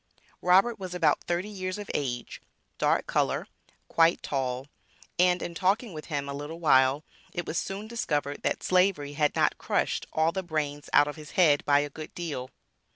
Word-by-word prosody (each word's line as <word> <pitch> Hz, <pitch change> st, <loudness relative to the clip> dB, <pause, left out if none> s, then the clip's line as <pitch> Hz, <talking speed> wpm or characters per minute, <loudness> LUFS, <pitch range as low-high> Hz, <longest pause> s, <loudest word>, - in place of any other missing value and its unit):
Robert 195 Hz, +6 st, +4 dB
was 185 Hz, -2 st, -6 dB
about 180 Hz, -, +2 dB
thirty 175 Hz, +3 st, -1 dB
years 185 Hz, -2 st, -4 dB
of 205 Hz, -1 st, -6 dB
age, 125 Hz, -4 st, -3 dB, 0.4 s
dark -, -, +2 dB
color, -, -, 0 dB, 0.4 s
quite 165 Hz, +1 st, +3 dB
tall, 130 Hz, -2 st, -2 dB, 0.5 s
and 180 Hz, 0 st, +4 dB
in 170 Hz, -, -5 dB
talking 200 Hz, +4 st, 0 dB
with 155 Hz, -1 st, -7 dB
him 145 Hz, -3 st, -3 dB
a 140 Hz, -, -4 dB
little 145 Hz, +4 st, -6 dB
while, 135 Hz, -2 st, +4 dB, 0.3 s
it 175 Hz, -, -3 dB
was 165 Hz, -, -1 dB
soon 195 Hz, +3 st, -5 dB
discovered 150 Hz, -12 st, -2 dB
that -, -, -1 dB
Slavery 180 Hz, -6 st, +2 dB
had 150 Hz, 0 st, +1 dB
not -, -, +2 dB
crushed -, -, -1 dB
all 160 Hz, +1 st, +2 dB
the 190 Hz, -, -2 dB
brains 150 Hz, -4 st, -3 dB
out 145 Hz, -, +6 dB
of 150 Hz, -, -5 dB
his 150 Hz, -1 st, -11 dB
head 155 Hz, -6 st, +5 dB
by 145 Hz, 0 st, +4 dB
a 145 Hz, -, -3 dB
good 155 Hz, +2 st, -9 dB
deal. 150 Hz, -7 st, -4 dB
160 Hz, 180 wpm, -28 LUFS, 145-185 Hz, 0.5 s, out